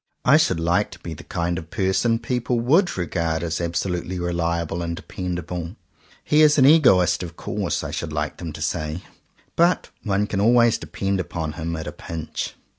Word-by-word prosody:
I - - +7
should - - +2
like 85 +5 +1
to 85 - -13
be 85 - -6
the 75 - -10
kind 85 -1 -2
of 80 - -11
person 105 +5 +1
people 120 +1 -1
would 160 - +3
regard 85 -2 -1
as 85 0 -2
absolutely 90 +1 -2
reliable 85 -1 -1
and 85 0 -3
dependable. 90 0 -5 0.5
"He 150 +1 +3
is 150 -1 +6
an 130 - +6
egoist, 125 - +5
of 85 -2 -7
course," - - -2
I - - -4
should 85 - -4
like 75 0 -3
them 85 -3 -6
to 75 0 -5
say, 80 +2 -2 0.5
"but 170 +2 +2
one 100 -1 0
can 100 -1 -2
always 120 +1 +4
depend 95 0 -2
upon 80 -3 -3
him 85 +1 -4
at 80 -1 -5
a - - -4
pinch." 80 -2 -6
90 Hz, 185 wpm, -23 LUFS, 85-105 Hz, 0.5 s, I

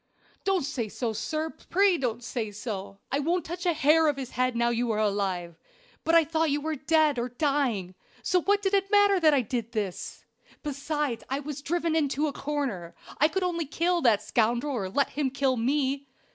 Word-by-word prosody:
"Don't 385 -4 +1
say 245 -6 -3
so, 230 +1 -3
sir! 310 +7 -2 0.2
pray 390 0 +4
don't 245 -5 -2
say 230 -2 -3
so! 205 -2 -6
I 275 - +1
won't 335 +3 0
touch 350 +2 -4
a 345 - +4
hair 315 +1 +4
of 290 -2 +1
his 260 -2 -5
head 255 -1 0
now 235 0 +2
you 240 0 0
are 220 - 0
alive; 190 -5 -1 0.4
but 330 - +3
I 335 - +7
thought 320 +1 +1
you 290 +1 +1
were 310 +1 -2
dead 300 -1 +2
or 240 +1 -2
dying, 245 - 0 0.3
so 365 -1 +2
what 405 +3 +2
did 385 0 0
it 395 0 +2
matter 405 -2 +5
then 315 -3 +5
what - - +4
I - - +3
did? 225 -4 -2 0.7
Besides, 290 -3 -2
I 270 +1 -1
was 290 0 -6
driven 335 +1 0
into 295 -1 +1
a 290 - -2
corner; 270 - -3 0.2
I 300 - +6
could 375 +4 -2
only 340 -4 -1
kill 345 +4 +1
that 230 -7 +3
scoundrel 240 +5 +1
or 200 -7 -2
let 280 +8 +1
him 280 -1 0
kill 270 -1 +1
me. 275 +3 0
280 Hz, 200 wpm, -27 LUFS, 235-320 Hz, 0.7 s, I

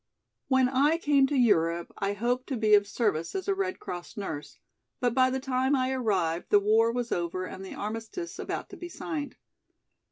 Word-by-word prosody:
"When 260 -1 +4
I 280 +5 +3
came 285 -4 +3
to 285 - -2
Europe 170 -8 +2
I 200 0 0
hoped 245 +5 -1
to 265 - -2
be 215 -1 +3
of 205 -1 +6
service 205 - -1
as 380 0 -3
a 400 - +3
Red 385 -1 -2
Cross 175 +3 -7
nurse, 160 -8 -6 0.4
but 245 -3 +1
by 255 0 +4
the 260 +1 -1
time 260 +1 +1
I 260 -1 +1
arrived 190 -10 0
the 205 - +6
war 220 +3 +3
was 240 0 -3
over 175 +1 -2
and 190 +1 -8
the 190 - -8
armistice 225 - -5
about - - -4
to - - -9
be 350 - -7
signed. 305 -4 -5
240 Hz, 195 wpm, -28 LUFS, 200-265 Hz, 0.4 s, of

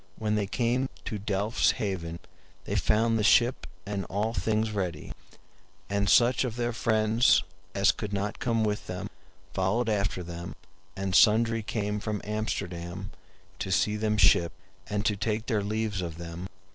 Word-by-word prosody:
When 110 -1 -1
they 105 -2 0
came 125 +4 0 0.2
to 105 - -3
Delfs 105 +3 +1
Haven 85 -5 -3 0.5
they 100 - -2
found 110 +4 +2
the - - +1
ship 120 +4 +4 0.2
and 100 -1 -3
all 105 +3 -1
things 110 -1 0
ready; 90 -7 -3 0.8
and 100 0 +1
such 120 +1 +5
of 120 -4 -3
their 120 0 -1
friends 110 -3 +3 0.3
as 100 0 +5
could 105 -2 -6
not 100 0 -2
come 115 -2 +1
with 105 -1 -2
them 90 +3 -5 0.4
followed 105 +5 +1
after 100 -3 0
them, 85 +1 -7 0.4
and 95 -1 -2
sundry 115 +2 +5
came 105 -1 -2
from 105 0 -3
Amsterdam 95 -3 -4 0.5
to 95 - -3
see 105 +3 +2
them 105 0 0
shipt, 85 -5 +4 0.3
and 105 0 -1
to 105 - +2
take 110 +2 -2
their 110 -4 0
leaves 105 -1 -2
of 85 -2 -5
them. 85 +2 -6
105 Hz, 160 wpm, -28 LUFS, 95-110 Hz, 0.8 s, such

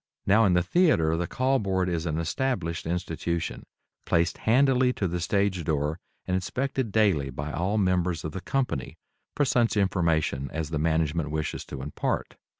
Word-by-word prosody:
Now 110 +3 +5
in 95 - +3
the 90 - +3
theatre 90 - +3
the 85 +1 -1
Call 130 +6 +1
Board 95 -2 0
is 85 -1 -2
an 80 -1 -1
established 85 -2 -2
institution, 85 -1 -3 0.4
placed 85 +1 +1
handily 130 0 +4
to 100 - -1
the 90 +1 -2
stage 95 +1 0
door 75 +2 -1 0.3
and 90 - -2
inspected 125 +6 -1
daily 95 -11 +2
by 70 +3 -5
all 95 +7 -1
members 90 -4 +1
of 80 - -4
the 95 - -6
company 80 - -2 0.4
for 145 - +2
such 120 -3 +2
information 85 -8 +1
as 80 0 -4
the 80 - -1
management 80 0 0
wishes 75 0 -3
to 65 - -7
impart. 75 - -3
90 Hz, 165 wpm, -27 LUFS, 80-105 Hz, 0.4 s, Now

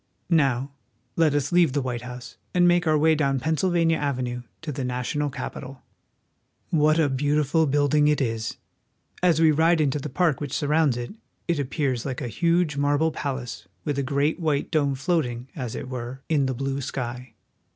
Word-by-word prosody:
Now 135 -4 +2 0.4
let 160 -3 +3
us 145 -1 0
leave 175 -6 +4
the 145 - +1
White 120 -2 -3
House 125 0 -9 0.2
and 175 0 +5
make 175 -1 +3
our 155 -1 +4
way 160 +2 +4
down 140 -3 +1
Pennsylvania 165 +3 +1
Avenue 125 -4 -2 0.2
to 160 - -3
the 135 -1 -4
national 125 +4 -2
Capitol. 135 0 -6
30 - - -17
WASHINGTON. 155 +4 -9
What 155 +2 +4
a 155 - +4
beautiful 150 +3 +2
building 145 +1 +3
it 150 0 +3
is! 115 -4 -2 0.6
As 175 -3 +3
we 160 -1 +6
ride 160 +2 +3
into 150 -1 +1
the 150 - -5
park 160 -1 +1
which 145 -3 -4
surrounds 150 -3 +2
it, 120 +6 -5 0.3
it 170 -4 0
appears 135 -3 -1
like 130 -3 -4
a 125 - -3
huge 170 +1 +1
marble 145 +3 +2
palace 125 -8 -5 0.2
with 145 -1 -1
a - - +2
great 140 +4 0
white 150 -4 -1
dome 145 -4 +1
floating, 130 -5 -1
as 125 -7 -4
it 135 - -5
were, 130 +1 -6
in 145 -4 +2
the 130 - -2
blue 135 +2 -2
sky. 125 -2 -5
145 Hz, 185 wpm, -25 LUFS, 130-160 Hz, 0.6 s, we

